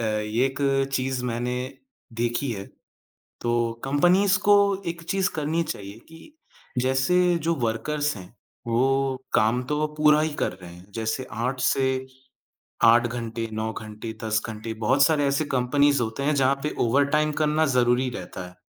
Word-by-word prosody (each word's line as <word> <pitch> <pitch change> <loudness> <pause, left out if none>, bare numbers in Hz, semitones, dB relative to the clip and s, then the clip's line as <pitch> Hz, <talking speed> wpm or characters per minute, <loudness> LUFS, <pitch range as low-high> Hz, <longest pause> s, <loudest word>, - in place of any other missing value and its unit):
अ, - - -1
एक 110 +5 -1 0.3
चीज़ 130 -1 -1
मैंने 125 +1 -2 0.7
देखी 120 +3 -1
है, 100 -2 -6 0.8
तो 120 -1 0
कंपनीज़ 180 +8 +3
को 205 0 +4 0.3
एक 170 0 -4
चीज़ 195 -1 +1
करनी 160 +2 0
चाहिए 100 -8 -7
कि 165 - -13 0.6
जैसे 130 +7 +2 0.3
जो 170 - +2
वर्कर्स 145 +6 -1
हैं, 90 - -10 0.4
वो 135 +3 +1 0.2
काम 115 +3 +3
तो 150 - +1
वो 155 - +1
पूरा 150 0 +5
ही 155 - 0
कर - - +1
रहे 90 -2 -12
हैं। 90 +1 -14
जैसे 115 +3 -2
8 125 +4 -2
से 130 0 +2 0.9
8 120 +1 +6
घंटे 115 -1 -4
9 110 +1 -2
घंटे, 110 +1 -7
10 110 0 0
घंटे, 110 +1 -6
बहुत 120 +6 +2
सारे 150 -1 +3
ऐसे 140 +2 0
कंपनीज़ 140 +2 +3
होते 115 +4 -4
हैं 150 +1 +1
जहाँ 135 0 +3
पे 150 - -2
ओवरटाइम 145 +5 +2
करना 155 +1 +2
ज़रूरी 125 +1 +2
रहता 90 0 -7
है। 90 - -15
130 Hz, 155 wpm, -25 LUFS, 115-145 Hz, 0.9 s, 8